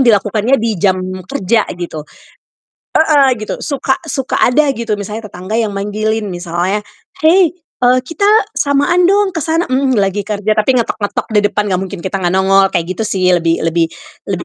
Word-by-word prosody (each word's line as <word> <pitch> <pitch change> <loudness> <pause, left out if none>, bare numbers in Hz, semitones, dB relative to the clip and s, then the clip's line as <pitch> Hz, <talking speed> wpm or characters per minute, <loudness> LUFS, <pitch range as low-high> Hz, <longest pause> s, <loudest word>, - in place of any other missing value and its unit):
yang 260 - +3
dilakukannya 215 +4 +2
di 230 -2 -1
jam 190 -2 +3 0.3
kerja 210 +3 0
gitu. 170 -3 -5 0.9
Heeh, 290 -4 +4
gitu, 215 - -4
suka 275 -2 -1
suka 270 -4 -2
ada 290 +5 +3
gitu 230 -1 -3
misalnya 210 +2 -4
tetangga 185 +5 -4
yang 220 -3 0
manggilin 210 +2 -2
misalnya, 175 +3 -2 0.4
"Hei, 355 +2 +5
eee 255 -6 0
kita 330 +8 0 0.2
samaan 290 +5 +2
dong 400 0 +2
ke 330 - -3
sana!" 325 +3 0
Mmm, 260 -1 +2
lagi 200 0 +1
kerja 210 +1 -1
tapi 215 +5 +2
ngetok-ngetok 220 -3 -2
di 210 - +4
depan, 210 - -1
nggak 180 - +1
mungkin 190 -1 -6
kita 190 +1 -2
gak 175 -1 0
nongol 195 0 +4
kayak 175 0 -2
gitu 220 +2 -3
sih. 190 -3 -1
Lebih 165 -2 +1
lebih 165 0 +1 0.4
lebih 185 -3 -3
215 Hz, 175 wpm, -15 LUFS, 190-270 Hz, 0.9 s, Hei